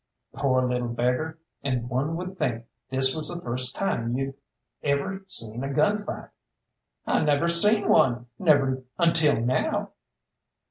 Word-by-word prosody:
"Poor 130 -2 +1
little 125 -1 -1
beggar! 125 +7 -1 0.2
And 125 -3 -2
one 135 +6 -1
would 185 +2 -6
think 120 -6 -1 0.2
this 130 0 +2
was 155 -1 -4
the 175 - -3
first 125 -2 -3
time 120 -11 -1
you'd 135 0 -3 0.5
ever 145 +8 -1
seen 115 - 0
a 135 - -3
gun 205 +9 +2
fight." - - -7 0.8
"I - - +1
never 150 +2 +2
seen 205 +5 +5
one, 130 - +3
never 135 -6 +3 0.2
until 165 -5 +3
now." 120 +3 -1
135 Hz, 140 wpm, -26 LUFS, 125-165 Hz, 0.8 s, seen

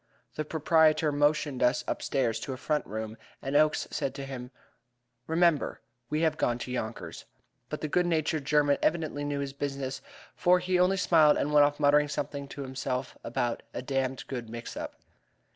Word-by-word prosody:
The 155 - -2
proprietor 155 0 +3
motioned 145 -2 +1
us 125 0 +3
upstairs 120 -5 0
to 135 - -4
a - - -6
front 150 +3 -1
room, 110 +1 -5 0.2
and 135 +1 -4
Oakes 155 +1 +3
said 140 -3 -2
to 140 -1 -5
him: 125 -2 -7 0.8
"Remember, 165 -1 +2 0.3
we 155 +1 0
have 160 -2 +2
gone 120 -5 +1
to 125 - -6
Yonkers." 115 -2 -5 0.4
But - - -5
the 155 - -1
good 175 +4 +2
natured 155 -2 0
German 145 -1 +3
evidently 155 -3 0
knew 145 -1 -2
his 140 -1 -4
business, 135 -1 -4 0.3
for 180 +1 +4
he 180 0 0
only 185 +2 +4
smiled 160 -5 +5
and 150 - -1
went 145 -1 +7
off 145 +1 -5
muttering 150 0 +4
something 140 -1 -4
to 140 - -7
himself 130 -1 -3
about 120 0 -1
a 125 - -3
"damned 135 -1 -2
good 120 -4 -5
mix 115 +1 -7
up." - - -6
145 Hz, 175 wpm, -29 LUFS, 130-155 Hz, 0.8 s, went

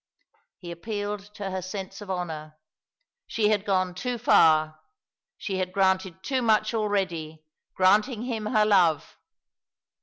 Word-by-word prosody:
He 175 -2 -9
appealed 205 +3 -5
to 200 -3 -5
her 185 0 -3
sense 195 +1 -7
of 205 - -10
honour. 160 -4 -5 0.7
She 210 -2 +1
had 210 -2 +1
gone 185 -2 0
too 245 +6 -3
far 155 -8 +4 0.6
she 190 -1 -4
had 185 -1 -2
granted 190 -1 0
too 265 -2 -1
much 215 -1 +2
already, 180 -8 -2 0.3
granting 210 +5 +3
him 225 -4 -3
her 215 -1 +3
love. 180 -7 +2
195 Hz, 130 wpm, -26 LUFS, 180-215 Hz, 0.7 s, far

